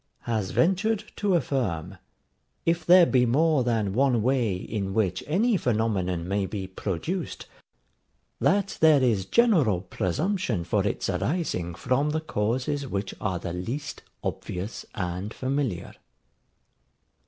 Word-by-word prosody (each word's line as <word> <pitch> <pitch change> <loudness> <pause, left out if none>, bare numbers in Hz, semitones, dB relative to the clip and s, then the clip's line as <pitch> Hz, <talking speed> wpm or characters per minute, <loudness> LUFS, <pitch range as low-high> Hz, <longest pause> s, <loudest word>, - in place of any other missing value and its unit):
] - - -46
has 110 -5 -2
ventured 200 - +2
to 200 -3 +1
affirm, 95 - -1 0.7
if 165 0 +1
there 180 0 +7
be 130 -5 +3
more 145 +3 +3
than 110 -5 0
one 125 -2 +2
way 120 -6 +1
in 95 +1 -4
which 100 -5 0
any 210 +9 +2
phenomenon 100 - 0
may 100 0 0
be 100 -2 -4
produced, 100 - -4 0.9
that 195 +1 +1
there 155 -4 +6
is 105 -7 +1
general 170 - +4
presumption 115 - -1
for 85 - 0
its - - -2
arising 115 - -1
from 135 - 0
the 155 +1 0
causes 135 +1 -1
which 100 -3 -3
are 95 -4 -1
the 85 0 -5
least 120 +12 -5 0.2
obvious 95 +5 -5
and 90 +2 -4
familiar. 130 -8 -2
120 Hz, 130 wpm, -26 LUFS, 95-155 Hz, 0.9 s, there